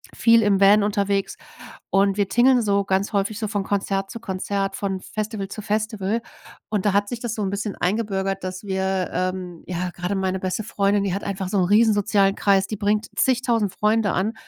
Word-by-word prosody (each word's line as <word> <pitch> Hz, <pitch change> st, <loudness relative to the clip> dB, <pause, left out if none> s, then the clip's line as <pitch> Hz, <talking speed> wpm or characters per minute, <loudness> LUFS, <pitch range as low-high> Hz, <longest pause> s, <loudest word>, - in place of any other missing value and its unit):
viel 230 Hz, -1 st, +5 dB
im 200 Hz, -1 st, +2 dB
Van 200 Hz, +1 st, +6 dB
unterwegs 200 Hz, -1 st, 0 dB, 0.5 s
und 195 Hz, 0 st, +3 dB
wir 200 Hz, -2 st, +1 dB
tingeln 250 Hz, +1 st, +4 dB
so 200 Hz, -2 st, +1 dB
ganz 195 Hz, +1 st, 0 dB
häufig 200 Hz, +1 st, 0 dB
so 215 Hz, -, -2 dB
von 205 Hz, -2 st, -1 dB
Konzert 195 Hz, -1 st, -1 dB
zu 230 Hz, -, -7 dB
Konzert, 195 Hz, -1 st, -2 dB
von 195 Hz, -2 st, -3 dB
Festival 215 Hz, -2 st, -4 dB
zu 215 Hz, -, -7 dB
Festival. 215 Hz, 0 st, -1 dB, 0.5 s
Und 210 Hz, -2 st, -1 dB
da 205 Hz, -, +3 dB
hat 205 Hz, 0 st, +1 dB
sich 240 Hz, -, -4 dB
das 235 Hz, -2 st, -4 dB
so 215 Hz, -, -4 dB
'n 195 Hz, -, -1 dB
bisschen 200 Hz, 0 st, -3 dB
eingebürgert, 195 Hz, -1 st, -1 dB
dass 185 Hz, +2 st, -5 dB
wir 190 Hz, -1 st, -1 dB
ähm, 185 Hz, -2 st, -3 dB
ja 180 Hz, 0 st, -2 dB
gerade 180 Hz, +3 st, -3 dB
meine 190 Hz, -1 st, -1 dB
beste 185 Hz, +3 st, -2 dB
Freundin, 200 Hz, -1 st, +1 dB
die 195 Hz, -3 st, -1 dB
hat 200 Hz, -, -3 dB
einfach 190 Hz, -1 st, -3 dB
so 200 Hz, -, 0 dB
'n 180 Hz, -, +3 dB
riesen 215 Hz, +4 st, +4 dB
sozialen 200 Hz, -1 st, +2 dB
Kreis, 195 Hz, -1 st, +2 dB
die 215 Hz, -, -4 dB
bringt 210 Hz, +1 st, 0 dB
zig 260 Hz, -1 st, +3 dB
tausend 225 Hz, -6 st, +1 dB
Freunde 215 Hz, -1 st, +1 dB
an 200 Hz, +5 st, 0 dB
200 Hz, 205 wpm, -23 LUFS, 190-215 Hz, 0.5 s, Van